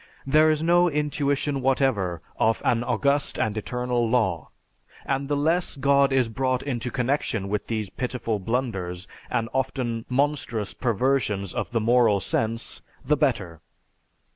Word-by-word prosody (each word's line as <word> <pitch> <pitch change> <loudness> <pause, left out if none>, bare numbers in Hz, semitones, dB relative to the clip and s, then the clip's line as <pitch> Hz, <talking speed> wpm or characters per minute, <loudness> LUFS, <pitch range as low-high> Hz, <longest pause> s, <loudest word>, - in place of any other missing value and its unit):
There 155 +3 +5
is 155 0 +1
no 175 +1 +4
intuition 145 -2 -1
whatever 120 - +1 0.2
of 110 0 +2
an 120 -1 +2
august 140 +3 0
and 110 -1 0
eternal 125 +1 -1
law, 95 -10 0 0.6
and 135 0 -1
the 145 0 0
less 165 +5 +1
God 140 0 +3
is 130 -3 +3
brought 130 +3 -1
into 125 -3 -3
connection 125 -6 -1
with 105 0 -2
these 110 -4 -3
pitiful 125 -4 -3
blunders 95 -5 -3 0.2
and 115 - 0
often 120 -3 -2
monstrous 130 -6 -1
perversions 115 -5 0
of - - -3
the 115 - 0
moral 115 -2 +4
sense, 115 +4 -2 0.2
the 150 - +3
better. 100 - -1
125 Hz, 140 wpm, -25 LUFS, 110-140 Hz, 0.6 s, There